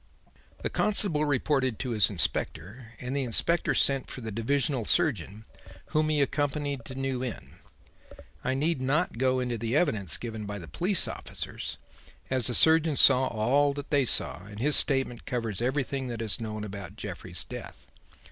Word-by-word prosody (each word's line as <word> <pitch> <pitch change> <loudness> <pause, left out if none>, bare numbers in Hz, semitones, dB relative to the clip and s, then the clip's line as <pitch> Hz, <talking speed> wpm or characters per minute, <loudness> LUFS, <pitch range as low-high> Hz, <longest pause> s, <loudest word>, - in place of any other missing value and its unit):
"The - - 0
constable 190 -8 +2
reported 135 -4 +1
to 130 - -3
his 110 -3 +4
inspector 105 +4 -3
and 125 +2 -4
the 140 - +1
inspector 135 +7 +1
sent 135 -1 +2
for 130 - -7
the 110 -1 -5
divisional 125 +3 0
surgeon, 110 - +1 0.5
whom 155 0 +2
he 150 -2 +2
accompanied 145 -2 -2
to 130 - -8
New 135 -1 -2
Inn. 90 - -7 0.9
I 130 - 0
need 150 0 0
not 135 -1 0
go 130 0 +2
into 125 -2 -2
the 115 +3 -1
evidence 110 - +2
given 110 -3 -6
by 105 0 -4
the 85 -4 -9
police 185 +1 0
officers, - - -5 0.5
as 130 -3 +2
the 120 - +1
surgeon 160 -1 +5
saw 130 -1 +6
all 140 +6 +2
that 145 0 -7
they 140 -3 +3
saw 90 - +3
and 105 0 -10
his 145 +5 +3
statement 135 -4 0
covers 115 -6 -2
everything 130 +1 -1
that 120 -2 -5
is 110 +2 0
known 110 -1 -4
about 100 -3 -7
Jeffrey's - - -6
death. - - -9
130 Hz, 165 wpm, -28 LUFS, 115-145 Hz, 0.9 s, saw